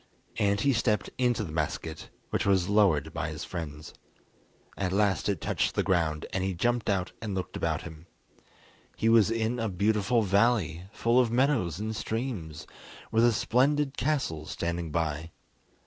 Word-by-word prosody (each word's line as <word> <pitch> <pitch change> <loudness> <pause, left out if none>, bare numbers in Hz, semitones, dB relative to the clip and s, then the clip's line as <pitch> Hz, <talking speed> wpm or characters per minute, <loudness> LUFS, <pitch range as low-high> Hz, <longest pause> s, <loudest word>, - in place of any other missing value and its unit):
And 100 0 +2
he 140 +2 +3
stepped 110 -3 0
into 120 -3 +2
the 85 - -6
basket, 80 0 -3 0.2
which - - 0
was 95 -3 +2
lowered 90 -7 +3
by 80 -1 -2
his 80 0 -6
friends. 80 -3 -7 0.8
At 95 -2 -2
last 100 -3 +1
it - - 0
touched - - -1
the - - +2
ground 80 -5 0
and 95 - 0
he 95 -1 -1
jumped 120 +5 0
out 95 -2 0
and 105 -4 -3
looked 95 - -4
about - - -1
him. 80 0 -11 0.9
He 115 - +1
was 115 -3 +5
in 115 +1 -1
a 115 -1 -1
beautiful 105 +4 +1
valley, 100 -4 +2
full 115 +2 +2
of 125 -2 +3
meadows 120 - +1
and 110 +1 -3
streams, 110 - -4 0.5
with 115 +1 +3
a 120 - +6
splendid 135 +6 +1
castle 125 - -1
standing 85 -1 -3
by. 80 0 -2
100 Hz, 165 wpm, -28 LUFS, 85-115 Hz, 0.9 s, a